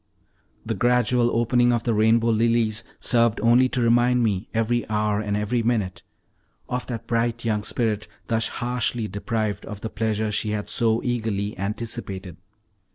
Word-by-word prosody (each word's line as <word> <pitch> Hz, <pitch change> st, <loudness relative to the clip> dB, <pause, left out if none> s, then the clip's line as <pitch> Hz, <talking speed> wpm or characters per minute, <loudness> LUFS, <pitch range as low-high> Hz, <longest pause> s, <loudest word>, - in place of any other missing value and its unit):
The 115 Hz, -, -1 dB
gradual 120 Hz, +2 st, +2 dB
opening 120 Hz, +1 st, +2 dB
of 120 Hz, -1 st, 0 dB
the 115 Hz, -, +1 dB
rainbow 110 Hz, +2 st, +3 dB
lilies 115 Hz, -1 st, +1 dB, 0.2 s
served 115 Hz, -2 st, +2 dB
only 120 Hz, +3 st, +5 dB
to 125 Hz, -, -1 dB
remind 120 Hz, +1 st, +3 dB
me 105 Hz, -2 st, -1 dB
every 115 Hz, +1 st, 0 dB
hour 105 Hz, -1 st, +1 dB
and 105 Hz, -1 st, -1 dB
every 110 Hz, +3 st, 0 dB
minute 110 Hz, -5 st, -1 dB, 0.7 s
of 125 Hz, 0 st, -3 dB
that 115 Hz, -3 st, -5 dB
bright 115 Hz, 0 st, -1 dB
young 105 Hz, -2 st, +1 dB
spirit 105 Hz, -1 st, -1 dB, 0.2 s
thus 115 Hz, -1 st, 0 dB
harshly 120 Hz, -2 st, -2 dB
deprived 105 Hz, +1 st, -2 dB
of 105 Hz, -2 st, -8 dB
the 110 Hz, -, -5 dB
pleasure 110 Hz, -1 st, -1 dB
she 105 Hz, +1 st, -1 dB
had 105 Hz, -1 st, -3 dB
so 115 Hz, -1 st, +2 dB
eagerly 110 Hz, -4 st, -2 dB
anticipated. 100 Hz, -3 st, -5 dB
115 Hz, 155 wpm, -24 LUFS, 105-120 Hz, 0.7 s, only